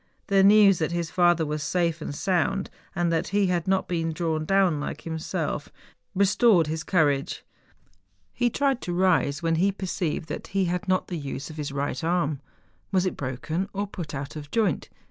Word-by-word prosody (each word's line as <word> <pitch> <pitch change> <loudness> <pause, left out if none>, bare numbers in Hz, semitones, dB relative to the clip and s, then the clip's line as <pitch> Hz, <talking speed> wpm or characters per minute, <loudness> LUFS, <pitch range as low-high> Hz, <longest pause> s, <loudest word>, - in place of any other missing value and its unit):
The 195 -1 +5
news 200 -1 +6
that 160 0 0
his 170 -3 -2
father 175 -2 +3
was 150 0 -3
safe 165 +1 0
and, 145 - -5
sound, 190 +3 0 0.2
and 175 -2 +1
that 165 +2 0
he 200 +1 +2
had 175 +1 -1
not 190 0 +1
been 165 -2 -1
drawn 160 -1 -1
down 190 -4 +3
like 145 - -5
himself, 160 -1 -3 0.5
restored 200 -1 +4
his 160 +1 -3
94 180 - +1
MOUNTAIN 145 - +4
ADVENTURES. 135 - -6
courage. - - -47 0.8
He 245 0 +1
tried 270 +1 0
to 175 - -3
rise, 175 -5 +2
when 165 0 +2
he 195 +4 +3
perceived 180 -5 -3
that - - -5
he 195 -1 0
had 180 +3 -2
not 185 0 +2
the 175 -3 -3
use 140 +1 -5
of 155 - -11
his 145 -2 -4
right 140 -1 -3
arm. 165 -4 0 0.5
Was 190 -1 +2
it 185 - -1
broken 145 +8 -3
or 200 +1 -1
put 175 -6 -7
out 135 +2 -5
of 145 -2 -7
joint? 205 -5 0
175 Hz, 200 wpm, -26 LUFS, 155-190 Hz, 0.8 s, news